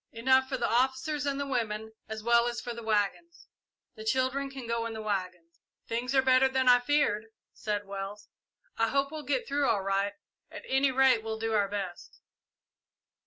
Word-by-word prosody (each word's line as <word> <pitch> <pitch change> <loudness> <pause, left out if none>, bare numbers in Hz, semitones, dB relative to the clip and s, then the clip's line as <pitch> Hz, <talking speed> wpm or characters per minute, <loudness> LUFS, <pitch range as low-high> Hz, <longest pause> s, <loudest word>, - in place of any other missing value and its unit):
"Enough 260 +3 +3
for 265 - -1
the 240 - 0
officers 265 +4 0
and 280 0 -1
the 280 - -1
women, 220 -5 -2 0.2
as 220 -1 -6
well 235 +1 +4
as 240 0 -3
for 240 - -5
the 235 - -8
waggons. 220 - -1 0.5
The 220 - -10
children 260 +4 0
can 270 -2 -8
go 230 0 -1
in 230 - -6
the 220 - -6
waggons." 185 -5 -4 0.3
"Things 245 +4 -2
are 265 - +5
better 260 0 +5
than 260 -1 0
I 245 0 +7
feared," 245 -5 +1 0.3
said 205 -1 -3
Wells. 200 +1 -7 0.5
"I 225 - +3
hope 275 +3 0
we'll 310 -1 -5
get 270 -2 -1
through 280 0 +1
all 200 -3 +1
right 195 +1 0 0.4
at - - -9
any 270 +1 +2
rate 260 -3 +4
we'll 220 0 -4
do 225 0 -2
our 205 -2 +2
best." 195 -3 -6
235 Hz, 190 wpm, -29 LUFS, 215-265 Hz, 0.5 s, I